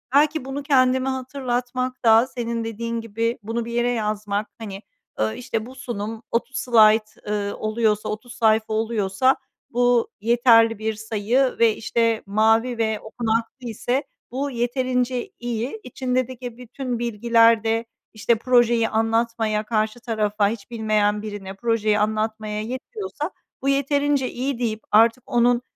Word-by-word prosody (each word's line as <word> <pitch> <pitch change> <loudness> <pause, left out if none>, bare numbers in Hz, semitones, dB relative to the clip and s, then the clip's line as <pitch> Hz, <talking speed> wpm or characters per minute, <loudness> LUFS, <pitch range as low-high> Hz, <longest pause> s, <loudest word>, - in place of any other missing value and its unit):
Belki 300 -1 +3
bunu 270 +2 -4
kendime 260 -1 +3
hatırlatmak 255 -1 -3
da 225 +2 +6
senin 235 -3 -3
dediğin 230 +1 -3
gibi 230 +1 -2
bunu 225 +2 -3
bir 235 - -6
yere 240 +1 +1
yazmak, 210 -2 -2
hani, 200 -3 -7 0.4
ııı, 110 0 0
işte, 225 -3 -3
bu 255 +2 -11
sunum 225 -3 -5
30 255 +3 -1
slayt, 220 -2 +4
eee, 205 -1 -1
oluyorsa, 215 -1 0
30 235 +3 -6
sayfa 220 -2 +2
oluyorsa 220 +2 +1 0.3
bu 245 -1 +2
yeterli 230 -1 +4
bir 220 0 -1
sayı 220 +5 0
ve, 225 -2 +4
işte, 230 0 0
mavi 225 +4 +2
ve 220 -2 0
okunaklı 230 +2 -3
ise 245 +5 -1 0.3
bu 280 +3 -2
yeterince 250 0 -1
iyi. 240 - -3
İçindeki 250 -1 -3
bütün 250 0 -5
bilgiler 230 -1 +3
de, 225 +1 0 0.3
işte, 225 +2 +2
projeyi 235 -1 +3
anlatmaya, 225 -1 0
karşı 215 +1 -1
tarafa, 215 -3 0
hiç 225 0 -7
bilmeyen 215 -2 +1
birine 205 -3 -6
projeyi 215 0 +1
anlatmaya 215 0 -1
yetiyorsa, 300 - -5 0.3
bu 275 - 0
yeterince 280 -1 +1
iyi 255 0 -3
deyip 225 -3 -2
artık 230 +3 +5
onun 240 0 +3
230 Hz, 135 wpm, -23 LUFS, 220-250 Hz, 0.4 s, da